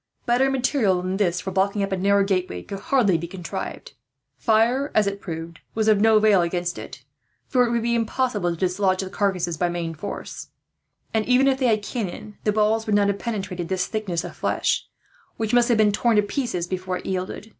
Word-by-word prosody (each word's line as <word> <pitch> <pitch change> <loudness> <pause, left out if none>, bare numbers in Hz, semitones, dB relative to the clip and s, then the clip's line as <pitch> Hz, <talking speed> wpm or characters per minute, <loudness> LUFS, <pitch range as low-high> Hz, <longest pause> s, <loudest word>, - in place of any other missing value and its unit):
Better 250 +2 +3
material 245 -8 +1
than 185 +1 -2
this, 180 -3 +1
for 190 - -4
blocking 200 +2 +1
up 195 - -3
a - - +1
narrow 200 +2 +3
gateway, 185 - -1
could 195 - -7
hardly 200 -7 +2
be 170 - -5
contrived. 175 -1 -6 0.4
Fire, 235 +5 +2
as 215 - +4
it 200 0 -2
was - - -30
proved, 165 -1 -6 0.2
was 220 -1 +1
of 210 -2 +4
no 220 0 +5
avail 210 -3 +5
against 175 0 -2
it, - - -10 0.4
for 250 -2 +3
it - - -2
would 235 -1 0
be 235 0 +1
impossible 230 -4 0
to 170 - -2
dislodge 185 +1 +1
the 190 - -7
carcasses 180 -5 -1
by 175 +2 +1
main 170 -1 -3
force; 175 +6 -7 0.7
and 220 -1 +2
even 255 +2 +4
if 265 -1 +2
they 260 - +2
had 215 -2 +2
cannon, 210 -2 -5
the 210 - +3
balls 220 +2 +1
would 210 - +2
not 200 -1 +3
have 200 0 -1
penetrated 195 -7 -4
this 185 -1 0
thickness 190 -7 -3
of - - -8
flesh, - - 0 0.5
which 220 0 -2
must 245 0 +4
have 235 - +4
been 215 -1 +4
torn 230 +2 +2
to 210 - +4
pieces 205 -6 -2
before 185 0 -3
it - - -11
yielded. 190 +3 -4
200 Hz, 215 wpm, -23 LUFS, 185-225 Hz, 0.7 s, no